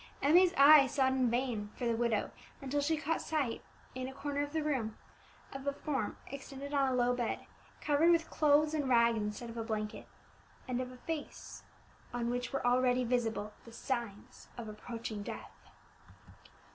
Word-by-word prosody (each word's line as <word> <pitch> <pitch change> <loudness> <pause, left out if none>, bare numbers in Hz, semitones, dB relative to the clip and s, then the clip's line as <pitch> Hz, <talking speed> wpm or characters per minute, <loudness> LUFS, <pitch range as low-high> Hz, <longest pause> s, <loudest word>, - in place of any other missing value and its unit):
Emmie's 345 +5 +5
eye 280 0 +9
sought 265 0 +2
in 255 -2 +2
vain 235 -4 -1
for 245 - -4
the 235 -1 +1
widow, 230 -2 0 0.3
until 275 +1 -1
she 315 +2 +1
caught 310 +2 -1
sight, 285 -7 -1 0.3
in 255 0 -4
a 265 - -7
corner 285 0 -2
of 290 0 -3
the 315 0 -1
room, 255 -8 -1 0.6
of 270 +1 -7
a - - +3
form 285 -1 -3
extended 275 +1 -8
on 275 -2 +3
a - - 0
low 245 0 +3
bed, 240 -2 -2 0.4
covered 300 +3 +3
with 335 -1 +3
clothes 300 0 +3
and 290 -4 -1
rags 235 -2 +4
instead 210 +3 -4
of 230 - -9
a 225 - -2
blanket, 215 -2 -4 0.6
and 255 0 -1
of 255 0 -5
a 255 - -12
face 315 +3 -6 0.5
on 240 0 -1
which 245 0 -3
were 275 -3 -2
already 250 0 +3
visible 225 -3 -1
the 230 - -13
signs 230 -4 -5
of 235 -2 -6
approaching 220 0 -6
death. - - -7
255 Hz, 175 wpm, -33 LUFS, 235-285 Hz, 0.6 s, eye